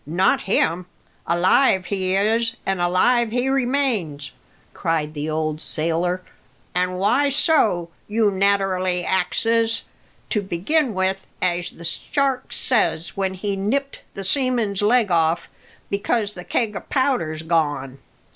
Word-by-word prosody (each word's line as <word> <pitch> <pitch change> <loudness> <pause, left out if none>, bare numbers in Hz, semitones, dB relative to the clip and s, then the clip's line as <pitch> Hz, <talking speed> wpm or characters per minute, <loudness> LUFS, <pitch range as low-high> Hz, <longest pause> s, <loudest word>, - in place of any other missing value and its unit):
Not 175 +5 +2
him! 175 -1 +1 0.4
Alive 185 +3 +3
he 190 -1 -1
is, 225 +3 +1
and 195 -2 -1
alive 220 +7 +3
he 245 +3 0
remains," 245 - 0 0.4
cried 155 -2 -1
the 150 +1 -4
old 155 0 -2
sailor. 170 +4 0 0.5
"An' 180 0 0
why 220 +10 +2
so? 220 - +2 0.2
you 215 -1 +2
naterally 190 -2 +1
axes. 225 +5 +1 0.5
To 210 - +1
begin 210 - 0
with, 190 0 -1
as 175 -1 0
the 170 - -11
shark 275 - -1
says 215 -9 +1
when 190 -1 -1
he 200 +1 -2
nipped 270 +9 -2
the 195 - -5
seaman's 235 -3 0
leg 215 -1 +3
off, 165 0 +1 0.4
because 205 +1 0
the 180 -2 -9
keg 210 +3 -1
o' - - -2
powder's 240 - -1
gone. 145 -5 -1
190 Hz, 125 wpm, -22 LUFS, 175-230 Hz, 0.5 s, Alive